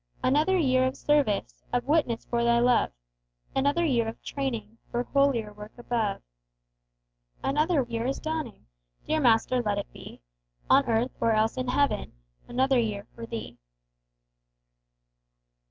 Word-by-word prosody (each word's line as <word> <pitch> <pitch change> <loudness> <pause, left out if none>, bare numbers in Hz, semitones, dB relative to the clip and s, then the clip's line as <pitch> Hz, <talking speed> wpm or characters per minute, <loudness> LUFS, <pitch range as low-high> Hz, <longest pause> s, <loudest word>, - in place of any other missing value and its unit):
Another 305 +8 +3
year 260 -5 +3
of 260 - -4
service, 215 - 0
Of 245 0 0
witness 285 -6 +1
for 235 0 -1
Thy 235 0 +4
love; 245 0 +3 0.7
Another 285 +5 +2
year 240 -7 +1
of 225 - -6
training 230 -6 -4
For 240 +1 -1
holier 255 -6 +1
work 210 +1 -11
above. 230 -4 -2 1.2
Another 300 +2 +2
year 235 0 -3
is 270 - -2
dawning! 315 -7 -4 0.4
Dear 315 - +1
Master, 245 -1 +3
let 210 -3 -1
it 205 - -5
be - - -11 0.5
On 275 +1 +7
earth, 235 +2 +1
or 230 - +3
else 220 +1 +2
in 255 -1 -3
heaven, 250 -4 0 0.3
Another 260 +1 +2
year 210 -3 -2
for 230 -1 -8
Thee! 230 -1 -7
245 Hz, 140 wpm, -27 LUFS, 225-275 Hz, 1.2 s, On